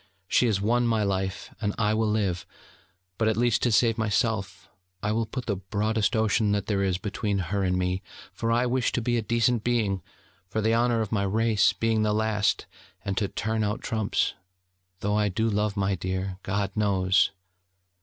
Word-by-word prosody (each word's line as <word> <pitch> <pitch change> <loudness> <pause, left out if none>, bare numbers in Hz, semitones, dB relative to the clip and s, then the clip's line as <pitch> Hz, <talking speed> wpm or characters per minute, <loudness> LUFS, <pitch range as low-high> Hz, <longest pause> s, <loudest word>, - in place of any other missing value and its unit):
She 125 - +3
has 105 -4 +1
won 120 +4 +2
my 110 -2 +2
life, 95 0 -2
and 105 -2 -1
I 105 -2 +2
will 110 0 +1
live.... 100 -5 -1 0.7
But 110 - +2
at 110 -1 +1
least, 120 -1 +2
to 120 - +2
save 115 +1 +3
myself, 110 -2 -1 0.4
I 105 - +1
will 115 +1 0
put 125 +3 -5
the 100 -4 -1
broadest 105 +4 0
Ocean 110 -1 +2
that 100 - -1
there 100 -2 0
is 95 -2 +1
between 105 0 -2 0.2
her 100 - +1
and 90 -1 +1
me: 90 +1 -1 0.3
for 115 - -1
I 120 +2 +3
wish 125 0 +1
to - - +1
be 120 0 +1
a - - +1
decent 115 +1 +1
being, 110 -6 0 0.5
for 110 - -2
the 110 +1 +2
honour 120 0 +2
of 110 - -3
my 110 -3 +1
race, 110 +1 +3
being 115 -1 +1
the 105 -1 +2
last, 105 -2 +1 0.4
and 100 - -1
to 100 - 0
turn 110 +2 -2
out 105 +1 -2
trumps... 110 -2 0 0.7
though 105 +1 0
I 105 -1 +2
do 110 +4 0
love 105 -1 0
my 100 0 +1
dear, 95 0 -3
God 100 +1 -1
knows....' 95 -3 +3
105 Hz, 195 wpm, -26 LUFS, 100-115 Hz, 0.7 s, She